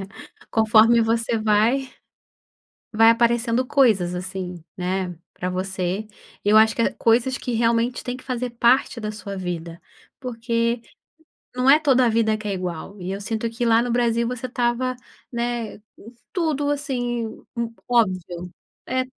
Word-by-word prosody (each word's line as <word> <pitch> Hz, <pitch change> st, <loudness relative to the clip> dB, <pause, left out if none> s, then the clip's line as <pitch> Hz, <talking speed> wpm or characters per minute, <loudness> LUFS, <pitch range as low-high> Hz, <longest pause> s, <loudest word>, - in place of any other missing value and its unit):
É. 195 Hz, 0 st, -13 dB
Conforme 225 Hz, +1 st, +5 dB
você 230 Hz, 0 st, 0 dB
vai, 220 Hz, +5 st, +2 dB, 1.0 s
vai 225 Hz, +1 st, +6 dB
aparecendo 235 Hz, +1 st, +2 dB
coisas, 220 Hz, -11 st, +3 dB
assim, 180 Hz, -1 st, -5 dB
né, 185 Hz, -1 st, -2 dB, 0.2 s
pra 180 Hz, -, -4 dB
você. 185 Hz, +2 st, -2 dB, 0.4 s
E 205 Hz, -, +1 dB
eu 215 Hz, -, +7 dB
acho 220 Hz, 0 st, +5 dB
que -, -, 0 dB
há -, -, +1 dB
coisas 240 Hz, +3 st, +2 dB
que 250 Hz, -, -4 dB
realmente 235 Hz, +1 st, +1 dB
têm 250 Hz, 0 st, -4 dB
que -, -, -14 dB
fazer 250 Hz, -1 st, -3 dB
parte 235 Hz, +1 st, +2 dB
da 215 Hz, -1 st, -3 dB
sua 200 Hz, -2 st, -7 dB
vida, 170 Hz, -2 st, -5 dB, 0.4 s
porque 235 Hz, -1 st, -1 dB, 0.7 s
não 250 Hz, +1 st, 0 dB
é 295 Hz, +3 st, +8 dB
toda 260 Hz, -5 st, +4 dB
vida 220 Hz, -1 st, +2 dB
que 215 Hz, -1 st, -7 dB
é 200 Hz, -, -1 dB
igual 185 Hz, +2 st, -5 dB
e 180 Hz, +2 st, -4 dB
eu 195 Hz, -, -4 dB
sinto 225 Hz, +2 st, -2 dB
que 240 Hz, +2 st, -3 dB
lá 230 Hz, 0 st, +4 dB
no 245 Hz, 0 st, -2 dB
Brasil 235 Hz, -1 st, +1 dB
você 250 Hz, 0 st, -4 dB
estava, 250 Hz, +1 st, -1 dB, 0.4 s
né, 235 Hz, -2 st, -3 dB, 0.2 s
hum, 225 Hz, +4 st, -13 dB, 0.2 s
tudo 305 Hz, -5 st, 0 dB
assim, 245 Hz, -5 st, -2 dB, 0.3 s
hum, 230 Hz, -1 st, -2 dB, 0.2 s
óbvio. 185 Hz, -6 st, 0 dB, 0.3 s
É. 255 Hz, 0 st, 0 dB
230 Hz, 155 wpm, -23 LUFS, 200-245 Hz, 1.0 s, é